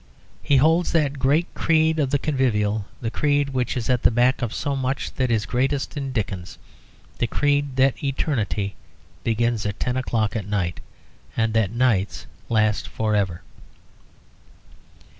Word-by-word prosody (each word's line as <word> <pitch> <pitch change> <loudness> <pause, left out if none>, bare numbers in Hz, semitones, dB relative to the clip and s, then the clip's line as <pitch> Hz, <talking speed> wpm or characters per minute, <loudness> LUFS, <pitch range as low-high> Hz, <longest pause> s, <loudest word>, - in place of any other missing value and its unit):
He 140 - +3
holds 160 +5 +3
that 145 -4 +1
great 145 +6 +3
creed 160 -1 +2
of 140 -3 +1
the 145 - +2
convivial, 110 -8 0
the 115 -2 -2
creed 145 0 +1
which 130 -2 -1
is 115 - -3
at 125 -2 +2
the - - +5
back 125 +3 +2
of 120 -3 -1
so 140 +3 -2
much 135 0 -2
that 130 -2 0
is 110 -2 +1
greatest 135 +5 -1
in 140 -2 -3
Dickens, 100 -6 -4 0.6
the 120 - +1
creed 145 +1 +1
that 135 +1 +2
eternity 115 -8 -1 0.5
begins 115 -1 0
at 100 -2 -3
ten 125 - -1
o'clock 115 -4 0
at 105 -3 -3
night, 95 -5 -1 0.6
and 110 -1 +1
that 110 -4 +2
nights 115 -4 0 0.2
last 110 -2 +1
forever. 105 -5 -1
125 Hz, 150 wpm, -23 LUFS, 110-140 Hz, 0.6 s, the